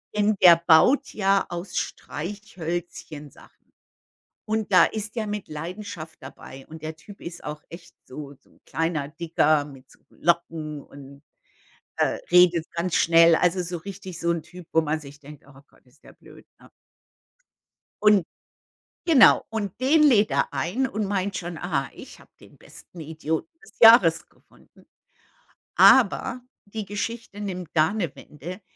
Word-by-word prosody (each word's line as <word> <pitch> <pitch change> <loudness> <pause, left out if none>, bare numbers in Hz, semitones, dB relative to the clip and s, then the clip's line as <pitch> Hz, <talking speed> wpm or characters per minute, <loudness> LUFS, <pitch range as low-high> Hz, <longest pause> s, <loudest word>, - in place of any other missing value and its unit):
denn 210 0 +2
der 170 -2 +9
baut 170 - +3
ja 195 -1 +1
aus 175 +2 -6
Streichhölzchen 170 - -6
Sachen. - - -21 0.7
Und 220 -1 -2
da 180 - +7
ist 215 +1 -5
der 220 - -2
mit 205 -3 -5
Leidenschaft 165 +1 -8
dabei. 135 0 -12
Und 160 0 -12
der 155 +1 -5
Typ 200 +6 -15
ist 170 0 -9
auch 150 0 -7
echt 170 +1 -13
so 140 +1 -9
so - - -30
'n - - -27
kleiner 160 -3 -2
Dicker 155 -2 +1
mit 135 -2 -14
so - - -21
Locken 160 -3 -2
und, 140 +1 -14 0.8
äh, - - 0
redet 175 -2 +5
ganz 170 0 -2
schnell. 165 0 +5
Also, 180 +2 +1
so 175 0 -5
richtig 190 0 -9
so 170 0 0
'n 170 -2 -2
Typ, 180 -2 -13
wo 160 - +3
man 155 0 -2
sich 140 -1 -13
denkt: 145 0 -14
„Oh 135 -1 -17
Gott, - - -28
ist 125 +4 -28
der - - -16
blöd, - - -18
ne?“ - - -19 1.3
Und 210 -5 +4 0.8
genau, 275 - +6
und 210 -2 -5
den 300 +4 +3
lädt 220 -8 +4
er - - -1
ein 225 +12 -1
und 215 -3 -3
meint 195 0 -2
schon, 175 -1 -6
„Ah, 155 -6 -3
ich - - -13
habe - - -20
den - - -18
besten 175 - -15
Idioten 160 - -4 0.2
des 440 - -19
Jahres 225 -8 +6
gefunden.“ - - -25 0.9
Aber 250 +1 +4 0.2
die 210 0 -7
Geschichte 210 +1 -6
nimmt 180 -4 -5
da 160 +3 +3
'ne 185 -9 -3
Wende. 175 +8 -10
175 Hz, 155 wpm, -24 LUFS, 155-205 Hz, 1.3 s, der